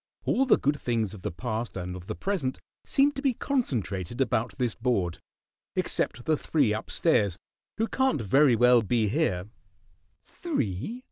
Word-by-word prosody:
All 270 Hz, +1 st, +2 dB
the -, -, +6 dB
good 145 Hz, +1 st, 0 dB
things 115 Hz, -5 st, -1 dB
of 105 Hz, -, -10 dB
the 105 Hz, -, -2 dB
past 110 Hz, +4 st, -4 dB
and 90 Hz, 0 st, -4 dB
of 90 Hz, 0 st, -10 dB
the -, -, -4 dB
present 180 Hz, -10 st, -2 dB, 0.3 s
seem 280 Hz, +1 st, +3 dB
to 275 Hz, -1 st, -6 dB
be 270 Hz, -4 st, +1 dB
concentrated 120 Hz, -, -2 dB
about 115 Hz, -5 st, 0 dB
this 120 Hz, -3 st, 0 dB
board 105 Hz, -8 st, -1 dB, 0.6 s
except 120 Hz, -, -1 dB
the 160 Hz, -, +3 dB
three 140 Hz, -7 st, +1 dB
up 110 Hz, -, -5 dB
stairs, 100 Hz, -, +2 dB, 0.4 s
who 225 Hz, +1 st, +1 dB
can't 265 Hz, -, +1 dB
very 125 Hz, +4 st, +4 dB
well 125 Hz, +1 st, +5 dB
be 110 Hz, 0 st, +1 dB
here." 100 Hz, -, 0 dB, 0.8 s
"Three?" 220 Hz, -, -3 dB
120 Hz, 160 wpm, -27 LUFS, 105-160 Hz, 0.8 s, the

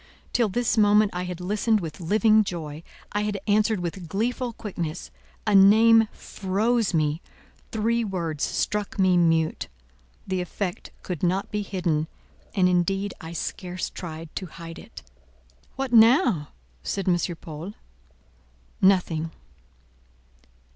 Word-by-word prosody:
Till 235 Hz, -3 st, +2 dB
this 235 Hz, +2 st, +1 dB
moment 210 Hz, 0 st, +5 dB
I 180 Hz, +1 st, -3 dB
had 180 Hz, -1 st, -5 dB
listened 210 Hz, +4 st, +1 dB
with 165 Hz, -3 st, -7 dB
living 215 Hz, +5 st, +4 dB
joy—I 170 Hz, +3 st, -6 dB
had 210 Hz, -1 st, -2 dB
answered 215 Hz, 0 st, +2 dB
with 175 Hz, 0 st, -5 dB
gleeful 240 Hz, +6 st, -1 dB
quickness; 175 Hz, -7 st, -5 dB, 0.3 s
a 210 Hz, -, +1 dB
name 220 Hz, +3 st, +7 dB
froze 215 Hz, +4 st, -1 dB
me; 155 Hz, -1 st, 0 dB, 0.5 s
three 230 Hz, +2 st, +1 dB
words 170 Hz, -7 st, -3 dB
struck 210 Hz, 0 st, -1 dB
me 185 Hz, -2 st, +4 dB
mute. 165 Hz, -2 st, +2 dB, 0.6 s
The 185 Hz, -1 st, -1 dB
effect 180 Hz, +1 st, -4 dB
could 175 Hz, -5 st, -5 dB
not 185 Hz, +2 st, 0 dB
be 210 Hz, -, -1 dB
hidden, 175 Hz, -6 st, -1 dB, 0.5 s
and 185 Hz, -2 st, +4 dB
indeed 195 Hz, +2 st, +1 dB
I 160 Hz, +1 st, -8 dB
scarce 180 Hz, +2 st, -4 dB
tried 160 Hz, -2 st, -8 dB
to 185 Hz, -, -4 dB
hide 165 Hz, 0 st, -10 dB
it. -, -, -12 dB, 0.7 s
"What 265 Hz, -2 st, -3 dB
now?" 225 Hz, -, +5 dB, 0.3 s
said 190 Hz, -, -3 dB
M. 180 Hz, -, +4 dB, 0.2 s
Paul. 165 Hz, +6 st, -8 dB, 1.1 s
"Nothing." 180 Hz, -4 st, +3 dB
190 Hz, 125 wpm, -25 LUFS, 170-215 Hz, 1.1 s, name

